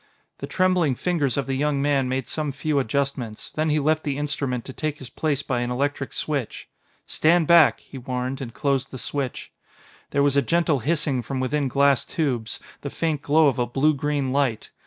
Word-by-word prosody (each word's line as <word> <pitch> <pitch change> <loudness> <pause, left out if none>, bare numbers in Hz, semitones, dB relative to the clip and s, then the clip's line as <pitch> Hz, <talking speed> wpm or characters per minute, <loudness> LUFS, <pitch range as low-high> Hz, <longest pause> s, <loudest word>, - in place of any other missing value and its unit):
The - - -5
trembling 180 -7 +2
fingers 150 -5 0
of 140 - 0
the 135 - -2
young 145 +1 0
man 140 -2 +1
made 130 -1 -1
some 150 +3 -3
few 140 +2 0
adjustments, 130 -3 -2
then 155 +1 0
he 150 - +2
left 155 +2 +1
the 140 -2 -2
instrument 140 -4 -2
to 130 - -8
take 155 +1 -3
his 130 -4 -10
place 145 -3 -1
by 125 -2 -1
an 120 0 -2
electric 135 +2 -2
switch. 140 -7 -3 0.4
"Stand 165 +1 +3
back," 170 -1 +6
he 135 - -10
warned, 125 +1 -3
and 120 -3 -5
closed 135 +1 -1
the 130 - -8
switch. 135 0 -4 0.6
There 140 - +1
was 140 -1 +2
a 140 - +5
gentle 165 +1 +1
hissing 145 -1 0
from 130 +3 -4
within 140 +2 0
glass 140 0 +3
tubes, 125 -8 -2 0.2
the 140 - -4
faint 155 -1 -1
glow 155 +2 +4
of 135 -2 +1
a 120 - +1
blue 140 +5 +2
green 145 -2 -1
light. 135 -6 0
140 Hz, 200 wpm, -24 LUFS, 130-150 Hz, 0.6 s, back